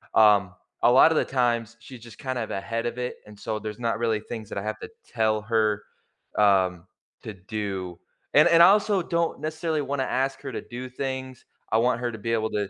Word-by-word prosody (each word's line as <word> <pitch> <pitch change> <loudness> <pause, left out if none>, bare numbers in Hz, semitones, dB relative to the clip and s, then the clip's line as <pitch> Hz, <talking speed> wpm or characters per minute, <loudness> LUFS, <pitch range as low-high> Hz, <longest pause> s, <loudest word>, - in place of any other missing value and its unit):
um, 100 -4 +5 0.3
a - - +5
lotta 145 +5 +7
the - - +2
times 120 -3 0
she's 125 +1 -11
just 115 -1 -13
kind 130 -2 -3
of 110 - -4
ahead 115 +4 -3
of 120 - -3
it 125 0 -4
and 105 -1 -13
so 110 +1 -4
there's 105 +1 -7
not 115 -2 -1
really 115 -2 0
things 110 -1 -7
that - - -6
I 100 - -3
have 110 0 -4
to - - -8 0.2
tell 110 -1 0
her, 110 -1 0 0.5
um, 95 -4 +3 0.4
to 110 - -6
do 95 -2 -5 0.3
and - - +7
and 170 0 +7
I 175 - +10
also 205 -2 +3
don't 170 -1 -1
necessarily 155 0 -2
wanna 140 -1 -2
ask 135 +1 -1
her 135 - -6
to - - -5
do 125 +1 -8
things, 130 0 -5 0.3
I 110 - +3
want 120 0 +2
her 120 -1 -1
to 110 - -7
be 115 +2 -4
able 110 -1 0
to 105 -2 -2
115 Hz, 215 wpm, -25 LUFS, 105-130 Hz, 0.5 s, I